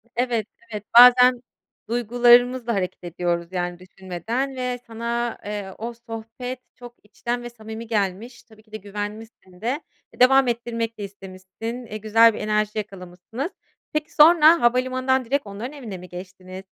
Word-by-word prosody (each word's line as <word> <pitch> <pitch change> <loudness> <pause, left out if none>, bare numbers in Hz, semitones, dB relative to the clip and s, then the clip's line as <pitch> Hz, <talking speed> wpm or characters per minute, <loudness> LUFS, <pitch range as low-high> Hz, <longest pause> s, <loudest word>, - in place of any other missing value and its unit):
Evet, 235 -3 0 0.2
evet, 210 -1 -5
bazen 250 0 +8 0.5
duygularımızla 240 +1 +4
hareket 185 -1 -3
ediyoruz 175 0 -2
yani 175 -1 -3
düşünmeden 190 +9 -4
ve 250 -1 -3
sana, 235 +1 -3
eee, 205 -2 -5
o 235 +2 -5
sohbet 230 +2 -7 0.2
çok 245 -1 -12
içten 240 +4 -4
ve 240 - -6
samimi 220 0 -9
gelmiş. 215 +3 -2
Tabii 220 -2 -20
ki 215 - -29
de 215 - -5
güvenmişsin 205 -2 -8
de 255 +7 -1 0.4
devam 265 +1 +6
ettirmek 230 -1 -2
de 205 - -6
istemişsin, 195 +5 -8
eee, 215 - -6
güzel 220 +1 +5
bir - - -6
enerji 210 0 0
yakalamışsınız. 200 - -6 0.4
Peki, 305 0 -3
sonra 325 +1 +7
havalimanından 255 +1 +1
direkt 275 0 -1
onların 215 +8 -6
evine 230 -10 -7
mi 180 0 -12
geçtiniz? 185 +1 -10
230 Hz, 145 wpm, -23 LUFS, 200-245 Hz, 0.5 s, bazen